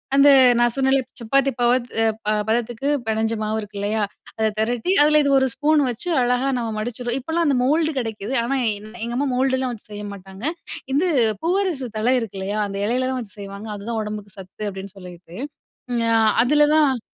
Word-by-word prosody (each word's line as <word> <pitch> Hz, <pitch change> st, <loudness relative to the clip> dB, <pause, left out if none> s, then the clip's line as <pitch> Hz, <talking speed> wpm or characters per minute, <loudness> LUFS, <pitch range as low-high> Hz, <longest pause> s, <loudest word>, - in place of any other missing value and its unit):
அந்த 280 Hz, +1 st, +7 dB, 0.3 s
நான் 240 Hz, -1 st, +3 dB
சொன்னேன்ல, 270 Hz, 0 st, +3 dB, 0.2 s
சப்பாத்தி 275 Hz, +4 st, +2 dB
பாவு, 240 Hz, +1 st, +4 dB, 0.2 s
அ, -, -, +4 dB, 0.2 s
பா 215 Hz, -, +2 dB, 0.2 s
பதத்துக்குப் 240 Hz, +4 st, 0 dB
பெணைஞ்ச 220 Hz, +1 st, 0 dB
மாவு 215 Hz, +1 st, -1 dB
இருக்கில்லயா! 210 Hz, +1 st, -2 dB, 0.4 s
அத 220 Hz, -, +3 dB
தெரட்டி, 235 Hz, +8 st, 0 dB
அதுல 300 Hz, 0 st, +5 dB
இது 280 Hz, -, +1 dB
ஒரு 265 Hz, -, +2 dB
ஸ்பூன் 300 Hz, +1 st, +2 dB
வச்சு 245 Hz, +10 st, -3 dB
அழகா 250 Hz, +2 st, +1 dB
நாங்க 230 Hz, -2 st, -2 dB
மடிச்சுருவோம். 240 Hz, +2 st, -3 dB
இப்பல்லாம் 325 Hz, +6 st, -1 dB
அந்த 280 Hz, -, +3 dB
மோல்டு 310 Hz, +4 st, +2 dB
கெடைக்குது, 225 Hz, 0 st, -4 dB
ஆனா, 270 Hz, +4 st, 0 dB, 0.2 s
என் 215 Hz, +2 st, -12 dB
எங்க 235 Hz, +1 st, -3 dB
அம்மா 285 Hz, -, 0 dB
மோல்டு 260 Hz, +1 st, +2 dB
எல்லாம் 260 Hz, -1 st, -2 dB
வச்சு 215 Hz, -, -13 dB
செய்ய 210 Hz, 0 st, -6 dB
மாட்டாங்க. 195 Hz, +1 st, -12 dB, 0.5 s
இது 310 Hz, +7 st, +2 dB, 0.4 s
பூவரசு 345 Hz, -7 st, 0 dB
தழை 235 Hz, +4 st, +2 dB
இருக்கில்லயா! 200 Hz, -2 st, -4 dB
அந்த 195 Hz, -, -6 dB
இலையில 255 Hz, +4 st, 0 dB
தான் 260 Hz, -, -2 dB
வச்சு 205 Hz, -2 st, -11 dB
செய்வாங்க. 200 Hz, +2 st, -8 dB
அதுதான் 220 Hz, +3 st, -4 dB
உடம்புக்கு 210 Hz, -1 st, -7 dB
சத்து 195 Hz, +3 st, -7 dB
அப்பிடின்னு 195 Hz, 0 st, -7 dB
சொல்லிட்டு, 175 Hz, -2 st, -12 dB, 0.8 s
அ, -, -, +5 dB, 0.3 s
அதுலதான் 295 Hz, -1 st, +3 dB
240 Hz, 175 wpm, -22 LUFS, 210-275 Hz, 0.8 s, அந்த